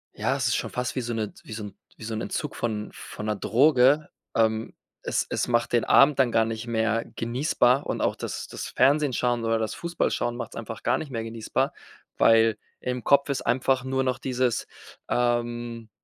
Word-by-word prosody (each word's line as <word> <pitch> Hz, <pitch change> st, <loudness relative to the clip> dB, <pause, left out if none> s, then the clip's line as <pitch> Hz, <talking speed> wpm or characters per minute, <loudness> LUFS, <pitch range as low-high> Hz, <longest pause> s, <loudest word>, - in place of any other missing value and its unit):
ja, -, -, 0 dB
es -, -, 0 dB
ist -, -, +2 dB
schon -, -, -2 dB
fast 125 Hz, 0 st, -3 dB
wie 130 Hz, -, 0 dB
so 120 Hz, 0 st, -3 dB
'ne 110 Hz, -2 st, -3 dB
wie 110 Hz, -, -9 dB
so 110 Hz, -, -5 dB
'n 105 Hz, -, -8 dB, 0.2 s
wie -, -, -11 dB
so 115 Hz, -, -4 dB
'n 110 Hz, -, -3 dB
Entzug 150 Hz, -, -3 dB
von 110 Hz, -2 st, -3 dB
von 105 Hz, -, -8 dB
'ner 105 Hz, 0 st, 0 dB
Droge. 135 Hz, +7 st, +4 dB, 0.3 s
Ähm, 110 Hz, 0 st, +1 dB, 0.3 s
es -, -, -1 dB
es -, -, -1 dB
macht 120 Hz, 0 st, +1 dB
den 120 Hz, -, +3 dB
Abend 140 Hz, 0 st, +5 dB
dann 125 Hz, -3 st, +4 dB
gar 115 Hz, -, +3 dB
nicht 115 Hz, +1 st, -5 dB
mehr 115 Hz, 0 st, +1 dB
genießbar 125 Hz, +2 st, +1 dB
und -, -, -2 dB
auch -, -, +1 dB
das -, -, -5 dB
das -, -, -6 dB
Fernsehen 145 Hz, -1 st, +3 dB
schauen 120 Hz, -1 st, 0 dB
oder 115 Hz, 0 st, +2 dB
das 110 Hz, -1 st, -2 dB
Fußballschauen 170 Hz, -8 st, -1 dB
macht's 120 Hz, -, -6 dB
einfach 115 Hz, -1 st, -7 dB
gar -, -, +2 dB
nicht 150 Hz, -, -6 dB
mehr 115 Hz, -2 st, -3 dB
genießbar, 115 Hz, -1 st, -2 dB, 0.4 s
weil 115 Hz, -1 st, +5 dB, 0.2 s
im 125 Hz, -1 st, -3 dB
Kopf 140 Hz, +4 st, +4 dB
ist 140 Hz, -, -1 dB
einfach 130 Hz, 0 st, +1 dB
nur 130 Hz, 0 st, 0 dB
noch 130 Hz, 0 st, -1 dB
dieses 130 Hz, -2 st, -1 dB, 0.4 s
ähm, 120 Hz, -1 st, -1 dB
120 Hz, 200 wpm, -26 LUFS, 115-130 Hz, 0.4 s, Abend